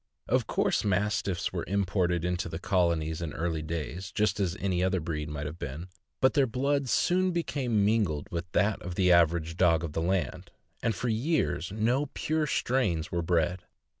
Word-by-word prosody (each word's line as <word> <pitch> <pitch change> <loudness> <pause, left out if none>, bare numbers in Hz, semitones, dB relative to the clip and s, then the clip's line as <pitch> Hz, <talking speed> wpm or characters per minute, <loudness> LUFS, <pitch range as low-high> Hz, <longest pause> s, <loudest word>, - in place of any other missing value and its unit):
Of - - +1
course - - +1
Mastiffs 100 -2 0
were - - -2
imported 90 -3 0
into 90 0 -1
the 80 - -4
Colonies 85 -4 0
in 80 -3 -4
early 80 -1 -2
days, 85 +4 -5
just 105 -1 +1
as 95 -1 0
any 90 -2 0
other 95 0 +1
breed 75 -2 -4
might 75 -1 -4
have 80 +3 -6
been, 80 +8 -6 0.3
but 130 - +4
their 140 -3 +3
blood 140 +3 0
soon 185 +7 +2
became 130 - 0
mingled 100 -9 +1
with 85 0 -4
that 105 +2 +2
of 90 0 -6
the 90 -1 +3
average 85 -1 +3
dog 85 -3 +4
of 80 -3 -4
the 80 - -1
land, 90 0 -1 0.3
and 115 - 0
for 125 - -3
years 120 - 0
no 120 +7 +1
pure 155 0 0
strains 105 - 0
were 85 - 0
bred. 85 +1 +1
90 Hz, 180 wpm, -29 LUFS, 85-110 Hz, 0.3 s, but